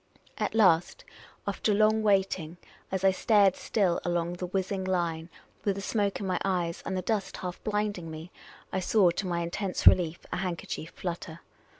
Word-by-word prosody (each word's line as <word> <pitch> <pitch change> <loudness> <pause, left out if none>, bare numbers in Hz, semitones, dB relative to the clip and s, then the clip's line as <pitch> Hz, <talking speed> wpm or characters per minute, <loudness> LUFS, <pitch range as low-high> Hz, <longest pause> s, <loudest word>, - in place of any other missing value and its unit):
At - - -1
last, 190 - +3 0.4
after 210 - 0
long 215 +1 +4
wait 195 -3 +2
ing, 160 +1 -8 0.3
as 190 0 -2
I 195 - +6
stared 200 0 +4
still 190 -6 0
along 175 0 -1
the 180 0 -5
whizzing 190 +1 -2
line, 170 -3 -1 0.3
with 200 -2 +1
the 200 - -5
smoke 200 -2 0
in 200 - -4
my 185 -1 0
eyes, 175 -3 -1
and 190 - -2
the 185 - -2
dust 210 -1 -2
half 180 -1 -6
blinding 210 -5 -2
me, 160 +2 -8 0.4
I 190 - +1
saw, 185 0 +4
to 185 +2 -3
my 170 -1 -1
intense 180 +3 -3
relief, 170 -2 +6 0.2
a - - -1
handker 180 -2 -3
chief 160 - -5
flutter. 170 -2 -6
185 Hz, 185 wpm, -28 LUFS, 170-200 Hz, 0.4 s, I